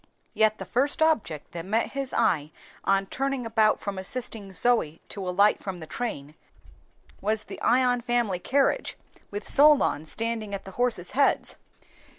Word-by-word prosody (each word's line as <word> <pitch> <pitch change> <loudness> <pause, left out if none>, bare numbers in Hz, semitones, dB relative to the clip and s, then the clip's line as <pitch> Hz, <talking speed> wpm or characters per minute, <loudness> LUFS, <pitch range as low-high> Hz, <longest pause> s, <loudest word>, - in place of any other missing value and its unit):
Yet 215 0 +3
the - - -7
first 275 +4 +1
object 230 - 0
that 170 -1 -6
met 215 +5 0
his 275 -1 -3
eye 150 -3 +1 0.3
on 195 0 +2
turning 270 +3 -2
about 220 -1 +2
from 200 -2 -4
assisting 215 -1 -5
Zoe 190 -7 +2
to 195 -2 -5
alight 200 +3 +3
from 190 -2 -5
the 160 - -8
train, 155 -7 -5 0.9
was 215 +1 0
the - - -10
Ion 245 0 +3
family 235 -6 0
carriage, 275 - 0 0.3
with 205 0 -6
Solon 285 - +4
standing 225 0 -3
at 195 - -8
the 195 - -8
horses' 230 -5 -1
heads. 280 +1 +2
220 Hz, 155 wpm, -26 LUFS, 190-245 Hz, 0.9 s, Solon